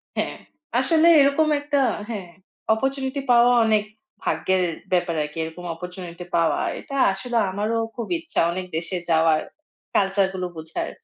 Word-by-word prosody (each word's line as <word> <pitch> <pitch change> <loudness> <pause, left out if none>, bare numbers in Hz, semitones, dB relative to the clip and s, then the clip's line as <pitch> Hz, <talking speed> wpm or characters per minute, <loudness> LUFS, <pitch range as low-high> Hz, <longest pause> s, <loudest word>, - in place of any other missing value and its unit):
হ্যাঁ, - - -2 0.4
আসলে 320 +5 +4
এরকম 280 +3 +4
একটা 290 0 0 0.3
হ্যাঁ, 195 -6 -5 0.4
opportunity 270 +3 -2
পাওয়া 240 +1 +6
অনেক 215 -1 +3 0.4
ভাগ্যের 185 -1 +1 0.3
ব্যাপার 175 -2 +1
আরকি। 150 +2 -8
এরকম 160 +2 -7
opportunity 180 0 -8
পাওয়া 165 -1 +2 0.2
এটা 275 - -8 0.2
আসলে 240 +4 -3
আমারও 210 +4 -1 0.2
খুব 235 - -4
ইচ্ছা 325 -1 -3
অনেক 185 +1 -4
দেশে 175 +2 -2
যাওয়ার, 160 -1 +4 0.5
culture 195 0 +3
গুলো 185 -1 -3
বোঝার। 160 0 -4
195 Hz, 135 wpm, -23 LUFS, 175-260 Hz, 0.5 s, পাওয়া